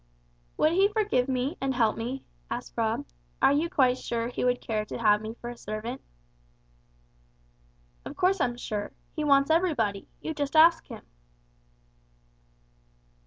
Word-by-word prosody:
"Would 310 - +3
He 385 +4 +4
forgive 415 - +1
me, 260 +5 -1
and 270 -1 -1
help 225 -3 +2
me?" 245 +4 -4 0.3
asked - - -5
Rob; - - -1 0.3
"are 275 - +5
you 310 +4 +1
quite 260 -7 +3
sure 235 0 -2
He - - -3
would 250 0 +2
care 215 -2 -2
to - - -6
have 210 -2 +3
me 220 +1 -6
for 240 0 -7
a - - -9
servant?" 230 +3 -6 2.0
"Of - - -8
course 370 0 +2
I'm 240 -2 0
sure. 210 -4 -4 0.2
He 305 - -2
wants 280 0 +4
everybody. 280 - +1
You 320 - -4
just 290 0 -3
ask 330 +1 +6
Him." - - -10
255 Hz, 150 wpm, -27 LUFS, 230-315 Hz, 2.0 s, ask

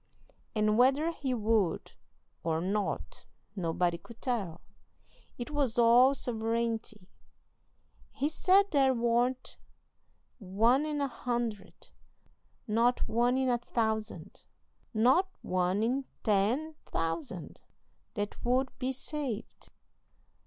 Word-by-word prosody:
And 215 +1 +2
whether 275 +6 +4
he 270 -6 -2
would 215 -6 0 0.5
or 160 -1 0
not 195 +4 -3 0.3
nobody 175 -1 0
could 230 +6 -14
tell; 200 - -3 0.8
it 245 +4 -6
was 275 -6 0
all 240 +3 +6
sovereignty. 225 -4 -2 1.0
He 285 - -1
said 380 +5 +3
there 270 -3 +4
warn't 240 +2 0 0.8
one 230 +9 +2
in 295 -1 -2
a 280 - +1
hundred, 235 -4 -4 0.8
not 230 +3 +2
one 240 +3 +2
in 265 0 +1
a 245 -1 +2
thousand, 220 -2 -3 0.5
not 260 - +3
one 185 +3 0
in 260 +4 0 0.2
ten 225 +10 +1 0.2
thousand, 165 +1 -4 0.5
that 205 -1 -4
would 255 +2 +2
be 255 0 -1
saved. 265 -3 -5
235 Hz, 105 wpm, -30 LUFS, 210-260 Hz, 1.0 s, all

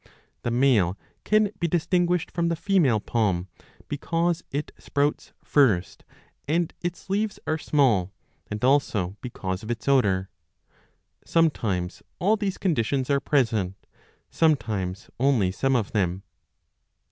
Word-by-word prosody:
The 120 - -2
male 115 -7 +3 0.3
can 215 -1 +3
be 170 - +1
distinguished 175 +1 +1
from 170 -1 0
the 170 - 0
female 165 - +2
palm, 95 -5 0 0.4
because 165 +3 -1
it 145 +2 -3
sprouts 145 0 -1
first 110 -11 +2 0.4
and 165 +2 0
its 175 0 -5
leaves 205 +2 -1
are 155 0 -1
small, 120 - +2 0.4
and 105 +3 -2
also 110 -9 +2
because 95 -6 -4
of 110 - -9
its 120 +1 -4
odour; 100 -9 +2 0.9
sometimes 105 - 0 0.2
all 205 +5 +3
these 205 -3 -2
conditions 140 - 0
are 140 - +3
present, 115 - +1 0.2
20 - - -42 0.4
sometimes 110 - 0
only 120 -8 +3
some 135 +7 +1
of 110 -5 0
them. 95 -2 0
135 Hz, 125 wpm, -25 LUFS, 100-165 Hz, 0.9 s, male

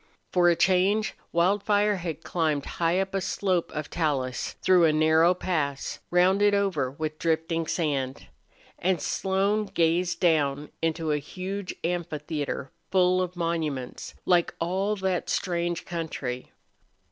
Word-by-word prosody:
For 175 -1 +5
a 170 - +4
change 190 +5 +2 0.2
Wildfire 205 +3 +2
had 170 -4 -5
climbed 155 -5 0
high 170 +2 0
up 195 0 -2
a 195 - 0
slope 185 -2 0
of 150 -1 -5
talus, 135 -7 -1
through 180 -2 +5
a 160 - +5
narrow 160 +3 +4
pass, 150 -7 -2
rounded 190 +3 +4
over 185 -10 +1
with 155 +3 -5
drifting 165 0 0
sand. 140 -5 -1 0.5
And 185 -1 +1
Slone 195 +6 0
gazed 170 0 +1
down 150 -4 +1
into 165 -1 0
a 150 - +1
huge 185 +6 -5
amphitheater 155 -5 -3 0.2
full 185 -1 +3
of 180 0 -3
monuments, 160 -7 -3
like 175 -2 +2
all 190 +5 0
that 190 -3 -1
strange 175 -2 -1
country. 145 -7 -4
170 Hz, 130 wpm, -27 LUFS, 155-185 Hz, 0.5 s, For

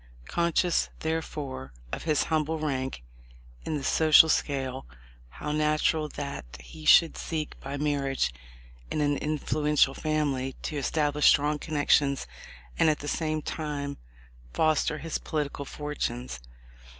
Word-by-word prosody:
Conscious, 170 - +1
therefore, 150 - -4 0.2
of - - -5
his 155 -3 +2
humble 160 0 0
rank 130 - -3 0.6
in 155 - -1
the 140 - -6
social 160 +3 +6
scale, 135 -3 -1 0.4
how 150 - -5
natural 155 +1 +1
that 140 - -6
he 155 - -12
should 165 +1 +7
seek 155 -2 -3
by 140 +1 -5
mar 145 -1 0
riage 135 - 0 0.6
in - - -2
an 145 -1 +2
influential 150 -2 +1
family 140 -4 -1
to 155 - -3
establish 145 +1 +2
strong 150 +1 +4
con 155 0 -5
nections 145 -1 +3 0.5
and 160 - +5
at 150 - +2
the 145 - -7
same 155 0 -1
time 145 -2 -4 0.6
foster 155 -1 +2
his 160 +2 -3
political 145 -2 -3
fortunes 125 - -4
150 Hz, 130 wpm, -28 LUFS, 140-155 Hz, 0.6 s, should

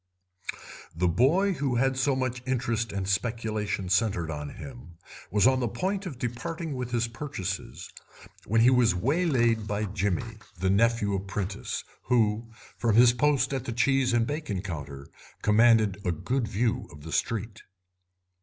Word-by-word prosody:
The 90 +2 +1
boy 150 - +3
who 135 -6 -1
had 135 +2 +2
so 130 +1 +1
much 130 -1 -2
interest 115 -3 -1
and 95 -1 -3
speculation 110 -1 -1
centred 95 -3 +1
on 75 -1 -5
him 120 -11 -10 0.3
was 105 +2 +3
on 130 0 +4
the 120 - 0
point 190 - -2
of 140 -8 -7
departing 155 +7 -4
with 125 -2 -4
his 120 -1 0
purchases 115 -7 -5 0.6
when 115 +2 +3
he 125 +3 +6
was 125 -4 +4
waylaid 120 - +1
by 105 +1 -1
Jimmy, 100 +3 -2 0.2
the 95 +1 +1
nephew 110 0 +2
apprentice, 95 0 -3 0.2
who, 115 -2 +1 0.3
from 115 -3 +2
his 120 +1 +7
post 140 +1 +2
at 130 -2 -3
the 120 - -3
cheese 135 +1 +2
and 120 -1 +2
bacon 145 - -3
counter, 70 -7 -6 0.4
commanded 110 -2 +4
a 90 - +1
good 120 - -1
view 110 +2 -1
of 75 0 -13
the 80 - -8
street. 110 +2 -2
115 Hz, 155 wpm, -27 LUFS, 100-130 Hz, 0.6 s, his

